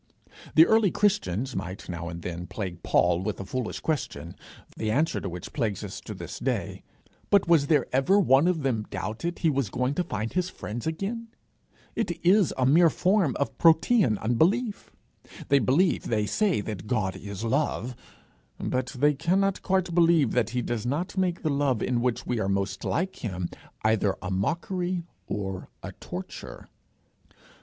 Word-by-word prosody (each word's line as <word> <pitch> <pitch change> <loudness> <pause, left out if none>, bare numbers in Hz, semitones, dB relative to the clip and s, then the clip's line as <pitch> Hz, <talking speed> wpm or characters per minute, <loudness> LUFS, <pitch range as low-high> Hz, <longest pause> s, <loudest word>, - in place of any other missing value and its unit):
The 160 - +9
early 220 -1 +4
Christians 190 - 0
might 95 0 -5
now 85 -1 -5
and 85 -1 -7
then 90 0 -5
plague 90 -5 -5
Paul 90 -1 +3
with 105 +1 -3
a 100 - -5
foolish 125 +3 -4
question, 155 -3 -3 0.4
the 110 - -2
answer 150 +9 +1
to 95 - -4
which 90 0 -8
plagues 110 -8 -1
us - - -6
to - - -7
this - - -7
day; - - -2 0.5
but 200 -3 +4
was 160 -4 +4
there 145 -4 +3
ever 160 +10 +4
one 140 -3 +5
of 170 -5 +1
them 115 -6 -1
doubted 110 - -4
he 165 - +2
was 135 -6 0
going 125 +5 -1
to 180 - 0
find 110 -8 -4
his 180 0 0
friends 120 -1 -6
again? 200 +8 -3 0.7
It 175 -7 -2
is 190 0 +5
a 130 - +2
mere 165 +6 +6
form 185 - +2
of 140 - -1
Protean 165 - +4
unbelief. 185 - +1 0.6
They 140 - +5
believe, 145 - +2
they 105 -2 0
say, 195 - +1
that 105 -2 -6
God 105 -6 0
is 100 0 -7
love; 130 0 -1 0.6
but 130 0 -1
they 145 +3 +4
cannot 185 +6 +1
quite 185 -2 0
believe 165 -6 +4
that 120 -3 +1
he 125 +1 -2
does 115 -3 -2
not 145 +11 -2
make 185 -2 0
the 155 - +1
love 140 -5 +1
in 125 -2 0
which 125 -1 -1
we 120 -2 -1
are 95 - 0
most 95 -1 -1
like 185 +4 -1
him, 90 -6 -4 0.3
either 110 -3 +2
a 90 - -5
mockery 175 - -1 0.2
or 95 -2 -4
a - - -5
torture. - - -8
135 Hz, 170 wpm, -27 LUFS, 105-175 Hz, 0.7 s, The